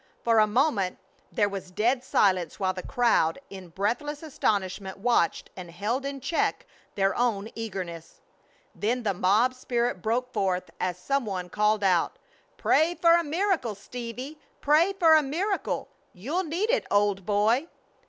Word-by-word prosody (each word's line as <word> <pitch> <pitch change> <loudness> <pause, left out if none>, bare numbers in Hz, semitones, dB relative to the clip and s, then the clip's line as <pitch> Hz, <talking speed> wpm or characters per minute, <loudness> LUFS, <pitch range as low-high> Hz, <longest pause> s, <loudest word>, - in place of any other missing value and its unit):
For 230 -1 +4
a 215 - +5
moment 210 -5 +1 0.3
there 205 - +2
was 195 -2 -6
dead 240 +7 +1
silence 185 -8 +1
while 190 -1 +1
the 185 - -6
crowd 225 -8 +2
in 190 -2 -9
breathless 245 - -2
astonishment 195 - -2
watched 205 -5 +1
and 180 -2 -8
held 215 +10 -2
in 280 0 -5
check 325 - -1 0.3
their 195 -1 +1
own 225 -3 0
eagerness. 185 -7 -6 0.5
Then 240 +4 -1
the 205 -3 +1
mob 205 +8 +3
spirit 240 -5 -2
broke 245 +4 -1
forth 185 -2 -1
as 180 -1 -1
some 275 +9 -1
one 185 -3 -4
called 210 +2 +1
out: 180 -3 +2 0.4
"Pray 330 +3 +2
for 335 -1 +4
a 340 0 +4
miracle, 325 - 0
Stevie! 245 +7 -7 0.2
Pray 315 +7 +3
for 340 -5 +5
a 310 - +7
miracle! 355 +9 -2 0.3
You'll 295 - -3
need 360 +9 -1
it, - - 0
old 205 -1 +2
boy!" 215 - +2
225 Hz, 155 wpm, -27 LUFS, 195-280 Hz, 0.5 s, a